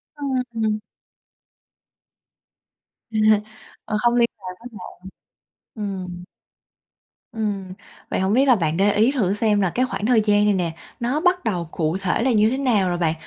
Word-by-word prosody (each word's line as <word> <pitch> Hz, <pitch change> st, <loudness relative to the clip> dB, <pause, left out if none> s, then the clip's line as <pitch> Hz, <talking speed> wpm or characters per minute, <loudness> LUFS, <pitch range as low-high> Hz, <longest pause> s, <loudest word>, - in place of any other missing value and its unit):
Ưm, 285 Hz, -1 st, -4 dB, 0.2 s
ừm. 215 Hz, -1 st, 0 dB, 2.3 s
À. 220 Hz, -, -9 dB, 0.7 s
Ờ, 215 Hz, -, -2 dB
không 240 Hz, +2 st, +2 dB
liên 235 Hz, -1 st, +3 dB
lạc 185 Hz, -2 st, -8 dB
với 245 Hz, -, -10 dB
bạn. 190 Hz, -5 st, -9 dB, 0.8 s
Ừm. 185 Hz, -4 st, -5 dB, 1.1 s
Ừm, 200 Hz, -4 st, -3 dB, 0.4 s
vậy -, -, -1 dB
hổng 190 Hz, +2 st, +1 dB
biết 265 Hz, +4 st, +4 dB
là 255 Hz, -, +6 dB
bạn 165 Hz, -5 st, -1 dB
để 200 Hz, +2 st, +4 dB
ý 220 Hz, +5 st, +4 dB
thử 210 Hz, -9 st, 0 dB
xem 210 Hz, -1 st, +1 dB
là 190 Hz, -, +2 dB
cái 255 Hz, -, +2 dB
khoảng 210 Hz, -4 st, -4 dB
thời 235 Hz, -1 st, +4 dB
gian 205 Hz, 0 st, +4 dB
này 205 Hz, -, +3 dB
nè, 170 Hz, -3 st, -1 dB, 0.2 s
nó 245 Hz, +5 st, 0 dB
bắt 360 Hz, +1 st, +2 dB
đầu 175 Hz, -6 st, -2 dB
cụ 160 Hz, +1 st, -1 dB
thể 185 Hz, +2 st, 0 dB
là 260 Hz, -, +2 dB
như 215 Hz, -1 st, +4 dB
thế 260 Hz, -, -1 dB
nào 225 Hz, -9 st, +2 dB
rồi 175 Hz, -, -1 dB
bạn? 165 Hz, -2 st, +1 dB
210 Hz, 170 wpm, -22 LUFS, 185-235 Hz, 2.3 s, là